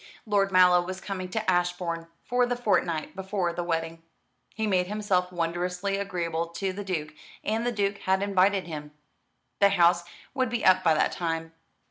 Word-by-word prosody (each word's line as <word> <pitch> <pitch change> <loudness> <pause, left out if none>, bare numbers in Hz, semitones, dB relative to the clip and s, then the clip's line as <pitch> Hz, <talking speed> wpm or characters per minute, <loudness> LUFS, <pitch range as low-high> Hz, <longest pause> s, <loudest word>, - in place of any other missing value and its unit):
Lord 200 -2 +2
Mallow 180 -1 +6
was 185 +1 -5
coming 190 -2 -5
to 220 +3 -3
Ashbourne 175 -2 0 0.2
for 245 0 +1
the 245 - 0
fortnight 180 -10 0
before 190 -2 -2
the 175 - -3
wedding. 165 -1 -2 0.5
He 220 - -3
had 215 - +1
made 180 -1 +2
himself 195 -3 0
wondrously 180 +3 -2
agreeable 170 -4 -2
to 185 +3 -3
the 205 +2 -5
Duke, 155 -6 -3 0.3
and 225 +3 -1
the - - +1
Duke 200 -2 -1
had 190 +1 +1
invited 195 0 +2
him. 150 -3 -7 0.7
The 200 - +6
House 175 -2 +4 0.3
would 260 -3 0
be 240 0 -2
up 185 0 +5
by 160 -3 +4
that - - +2
time. 165 -1 -3
185 Hz, 175 wpm, -27 LUFS, 170-200 Hz, 0.7 s, Mallow